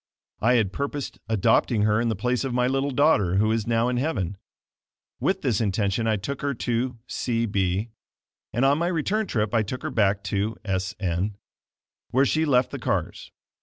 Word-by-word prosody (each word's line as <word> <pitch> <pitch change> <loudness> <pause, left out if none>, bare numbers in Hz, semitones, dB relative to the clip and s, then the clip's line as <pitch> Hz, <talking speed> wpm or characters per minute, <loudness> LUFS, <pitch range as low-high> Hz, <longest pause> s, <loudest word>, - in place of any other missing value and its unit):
I 120 +3 +3
had 105 -5 +1
purposed 140 0 -4
adopting 110 +1 +3
her 105 +1 +3
in 120 - +1
the 110 - 0
place 125 +6 0
of 130 -3 -2
my 125 0 +2
little 135 +2 0
daughter 125 - +3
who 110 +3 +3
is 115 -1 -1
now 115 0 +2
in 125 0 0
heaven. 120 - -1 0.8
With - - 0
this 115 -4 +1
intention 100 +1 0
I 110 - +3
took 125 +7 -4
her 140 -1 -1
to 120 +1 -1
C 115 -2 -1
b, 100 +1 -1 0.6
and 120 +4 +1
on 140 +2 +3
my 170 - +1
return 190 +5 0
trip 105 - -1
I 115 - +4
took 115 +5 -5
her - - -3
back 100 -2 +2
to 105 +3 -1
S 95 -2 -2
n, 95 +2 -1 0.7
where 135 +3 +3
she 155 +3 +1
left 130 -4 +3
the - - -5
cars. - - -2
115 Hz, 190 wpm, -25 LUFS, 100-130 Hz, 0.8 s, I